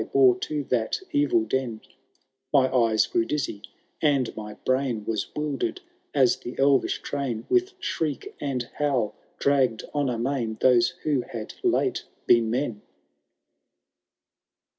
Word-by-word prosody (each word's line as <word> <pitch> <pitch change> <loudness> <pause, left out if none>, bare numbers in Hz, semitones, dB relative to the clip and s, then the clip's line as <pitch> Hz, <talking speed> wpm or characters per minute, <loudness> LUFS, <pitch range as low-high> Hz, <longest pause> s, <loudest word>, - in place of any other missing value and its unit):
Bore 130 -3 +6
to 150 +1 -2
that 120 -4 0
evil 300 +4 +3
den 130 - -2
I - - -28 0.6
My 130 -1 +3
eyes 115 -3 +4
grew 115 - +1
dizzy, 135 -6 -2 0.4
and 140 -6 +2
my 105 -1 -7
brain 130 -5 -1
Was 110 -2 -1
wilderM 150 - -2 0.4
as 130 -4 +4
the 120 - -8
elvish 135 -1 +2
train. 125 -6 -3
With 370 +1 +2
shriek 155 - -3
and 135 -4 -2 0.2
howl, 135 -8 +1 0.2
dragged 130 -5 +2
on 145 -2 +1
amain 120 -2 -1
Those 125 -2 +5
who 145 -4 +1
had 115 -2 -7
late - - +1 0.2
been 115 -2 +4
men. 120 -3 -2
130 Hz, 130 wpm, -26 LUFS, 115-145 Hz, 0.6 s, Bore